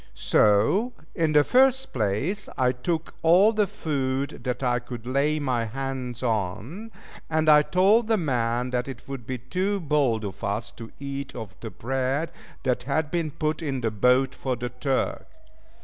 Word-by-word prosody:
So 110 - +3 0.2
in 160 -2 +1
the 150 -1 +6
first 265 - +3
place, 130 - -1
I 125 -1 +3
took 160 +6 -3
all 185 +7 +6
the 210 -2 +2
food 135 -4 -2
that 125 +1 -2
I 125 -1 +2
could 120 -1 -8
lay 140 +4 +1
my 125 -6 0
hands 130 0 -4
on, 115 - -2 0.4
and 155 0 +1
I 150 -1 +8
told 200 +8 +3
the 225 -1 +3
man 125 - 0
that 125 0 -1
it 135 - -8
would 135 -5 -7
be 130 - -2
too 185 - -1
bold 140 - +1
of 100 +1 -7
us 100 +3 -2
to 115 -1 -10
eat 140 0 -5
of 110 -6 -7
the 115 - -6
bread 135 +7 -2 0.3
that 125 -2 +1
had 150 +1 0
been 165 -2 0
put 155 +1 -2
in 135 -5 -2
the 115 -2 0
boat 125 +5 +3
for 130 -2 -2
the 125 +1 -4
Turk. 130 +2 -2
135 Hz, 170 wpm, -25 LUFS, 120-160 Hz, 0.4 s, I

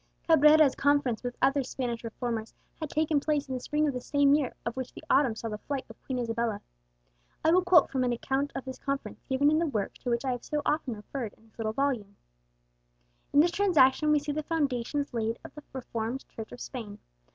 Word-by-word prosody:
Cabrera's 305 -3 +6
conference 285 -5 +2
with 245 0 -5
other 275 +1 +4
Spanish 245 -2 -4
reformers 230 -1 -4 0.2
had 315 -2 -4
taken 310 0 +1
place 295 -1 0
in 260 - -4
the 255 - -2
spring 300 +4 0
of 285 - 0
the 250 - -4
same 285 +1 +3
year 290 -4 +1
of 235 - -2
which 260 -1 -4
the - - -10
autumn 265 -6 +4
saw 225 - -5
the 210 -1 -5
flight 275 +2 -4
of 225 - -18
Queen 260 - -2
Isabella. 230 -3 -1 0.9
I 320 - +6
will 365 +2 +5
quote 355 -4 +5
from 260 -1 +1
an 250 - +1
account 270 +4 -1
of 270 - -4
this 260 -1 -7
conference 275 0 -4
given 280 +2 +3
in 310 - +3
the 335 - +1
work 215 -8 -2
to 250 - -4
which 235 +2 0
I 260 - +1
have 245 -1 -4
so 300 -1 -2
often 295 -6 0
referred 215 +1 -6
in - - -25
this 225 +1 -26
little 215 -1 -1
volume: 245 -7 -1 1.2
"In 290 - +6
this 345 +2 +3
transaction 305 -7 +4
we 300 - +5
see 290 0 -2
the 305 +2 -2
foundations 285 -3 -1
laid 225 -1 -1
of - - -10
the 300 - -10
Reformed 240 -1 -4
Church 220 -1 -8
of 245 - -9
Spain. 215 -5 -7
265 Hz, 220 wpm, -29 LUFS, 235-290 Hz, 1.2 s, Cabrera's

